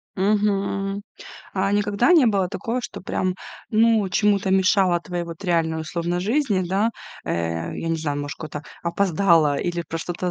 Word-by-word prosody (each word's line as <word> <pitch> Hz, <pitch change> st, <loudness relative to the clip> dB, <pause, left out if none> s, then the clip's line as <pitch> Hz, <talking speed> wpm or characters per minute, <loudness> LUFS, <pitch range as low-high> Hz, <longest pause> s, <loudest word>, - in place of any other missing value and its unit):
Мгм. 200 Hz, 0 st, 0 dB, 0.5 s
А 195 Hz, +1 st, +1 dB
никогда 205 Hz, -, +2 dB
не 305 Hz, -8 st, +6 dB
было 195 Hz, -4 st, +2 dB
такого, 240 Hz, +4 st, -3 dB
что -, -, -7 dB
прям, 185 Hz, 0 st, -1 dB, 0.4 s
ну, 225 Hz, -2 st, +4 dB
чему-то 200 Hz, 0 st, +2 dB
мешало 190 Hz, -2 st, +3 dB
твоей 175 Hz, -1 st, -4 dB
вот 170 Hz, +1 st, -9 dB
реальной, 165 Hz, -2 st, +1 dB
условно, 175 Hz, +2 st, -2 dB
жизни, 215 Hz, 0 st, +1 dB
да? 200 Hz, +6 st, +1 dB, 0.3 s
Э, 85 Hz, 0 st, -2 dB
я 165 Hz, -, -4 dB
не 165 Hz, -, +1 dB
знаю, 150 Hz, -3 st, -2 dB
ну, -, -, -2 dB
может, 145 Hz, -, -6 dB
куда-то 150 Hz, -2 st, -7 dB, 0.2 s
опоздала 170 Hz, -4 st, +3 dB
или 175 Hz, +2 st, -2 dB
про 165 Hz, -, -3 dB
что-то 175 Hz, +2 st, -3 dB
185 Hz, 165 wpm, -23 LUFS, 170-205 Hz, 0.5 s, не